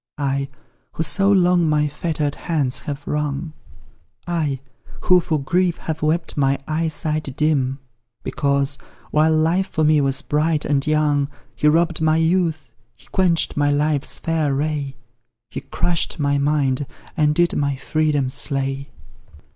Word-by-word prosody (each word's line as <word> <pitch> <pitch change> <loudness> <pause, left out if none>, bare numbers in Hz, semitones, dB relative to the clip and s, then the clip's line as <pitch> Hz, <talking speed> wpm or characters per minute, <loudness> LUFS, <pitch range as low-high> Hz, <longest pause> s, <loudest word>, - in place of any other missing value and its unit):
I, 140 -1 -1 0.4
who 165 - -1
so 195 +5 +3
long 180 -3 +4
my 150 0 +2
fetter'd 150 -1 -2
hands 150 -8 -1
have 145 -2 -6
wrung; 150 +1 -2 0.7
I, 155 -6 -1 0.4
who 180 0 +5
for 155 -2 -1
grief 175 +5 +1
have 160 0 -5
wept 160 +2 0
my 140 -1 +2
eyesight 155 -3 -1
dim; 140 -4 +1 0.5
Because, 140 0 0 0.3
while 155 +1 +3
life 170 +5 +2
for 160 - 0
me 150 -1 +4
was 135 -1 0
bright 150 +1 0
and 140 -1 0
young, 150 -2 +2 0.3
He 150 - +1
robb'd 165 +1 +2
my 160 0 +3
youth 160 -6 0 0.2
he - - -22
quench'd 175 -3 +2
my 145 0 +2
life's 145 0 0
fair 155 -4 0
ray 145 -1 -2 0.6
He - - -5
crush'd 175 -2 -1
my 140 -1 +1
mind, 140 -2 +1 0.3
and 150 -2 +2
did 175 +1 +2
my 140 -1 0
freedom 150 0 0
slay. 135 0 -2
150 Hz, 140 wpm, -21 LUFS, 140-160 Hz, 0.7 s, who